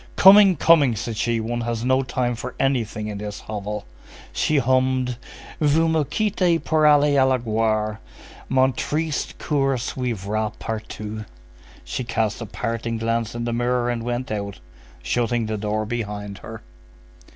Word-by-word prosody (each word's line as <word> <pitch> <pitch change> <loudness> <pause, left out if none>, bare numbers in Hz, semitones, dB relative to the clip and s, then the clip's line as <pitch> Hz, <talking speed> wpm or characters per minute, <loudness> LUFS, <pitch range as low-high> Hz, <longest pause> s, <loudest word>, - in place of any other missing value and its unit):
"Coming! 195 -1 +8
Coming!" 145 -6 +4
said 115 +2 -4
she. 115 +1 0
"One 120 +2 -2
has 115 0 -2
no 130 +1 +3
time 125 -1 -1
for 120 +2 -6
anything 115 -5 0
in 105 -1 -5
this 105 0 -6
hovel!" 105 0 -5 0.5
She 155 - +1
hummed:— 130 -1 +2 0.4
Vous 155 +2 +3
me 160 -1 +2
quittez 185 0 +1
pour 155 -1 +3
aller 145 0 +5
à 130 - +4
la 130 - +3
gloire; 110 -2 0 0.5
Mon 130 0 +3
triste 155 +4 -2
cœur 135 -3 0
suivra 110 -4 -2
partout.29 110 -1 -5 0.6
She 130 - -4
cast 115 -2 -1
a 115 - -5
parting 115 +2 -3
glance 115 0 -1
in 120 - -3
the 120 - -1
mirror 120 0 +1
and 120 -1 -3
went 120 +1 -3
out, 100 -2 -4 0.5
shutting 120 - 0
the 110 0 -2
door 105 +1 -2
behind 105 -3 -4
her. - - -9
120 Hz, 150 wpm, -23 LUFS, 110-130 Hz, 0.6 s, Coming